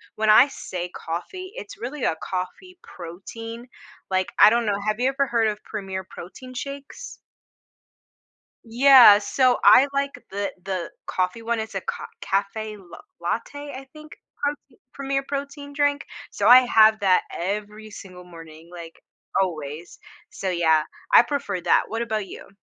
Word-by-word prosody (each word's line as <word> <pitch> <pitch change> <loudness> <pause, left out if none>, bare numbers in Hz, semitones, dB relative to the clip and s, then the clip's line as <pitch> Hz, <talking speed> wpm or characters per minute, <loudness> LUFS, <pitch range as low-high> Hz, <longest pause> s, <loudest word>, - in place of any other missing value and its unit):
when 215 0 0
I 235 +6 +8
say 180 -10 -6
coffee, 185 - -7
it's - - -9
really 260 +4 -5
a - - +1
coffee 190 - -6
protein. 225 +7 -9 0.4
Like, 185 -1 -1
I 210 - +9
don't 235 +1 +1
know, 205 -1 0
have 215 +1 -1
you 250 - +2
ever 275 +1 0
heard 230 -2 +1
of 210 -1 -4
Premier 195 -3 -6
Protein 255 +9 -11
shakes? 280 - -8 1.5
Yeah, 245 -2 +7
so 255 +4 +2
I 265 - +8
like 280 0 0 0.2
the 200 +1 -3
the 185 -3 -4 0.2
coffee 185 +5 -2
one. 230 0 -1
It's 220 -2 -7
a 195 - -2
co - - -6 0.2
café 210 +2 -2
l 190 -3 -17 0.3
latte, 285 0 -4
I 265 +1 -8
think, 305 0 -13 0.3
prote 285 -3 -5
Premier 275 0 -2
Protein 285 +1 -6
drink, 285 0 0 0.3
so - - 0
I 250 +1 +10
have 220 -3 +5
that 190 -2 +3
every 210 +4 -5
single 185 -3 -11
morning, 165 -2 -13
like, 170 -2 -11 0.4
always, 160 -2 -4 0.3
so, 190 - -4
yeah, 160 -3 +3 0.3
I - - +9
prefer 235 -7 -3
that. - - +3
What 225 +1 -3
about 215 -3 -3
you? - - -11
220 Hz, 155 wpm, -23 LUFS, 185-270 Hz, 1.5 s, I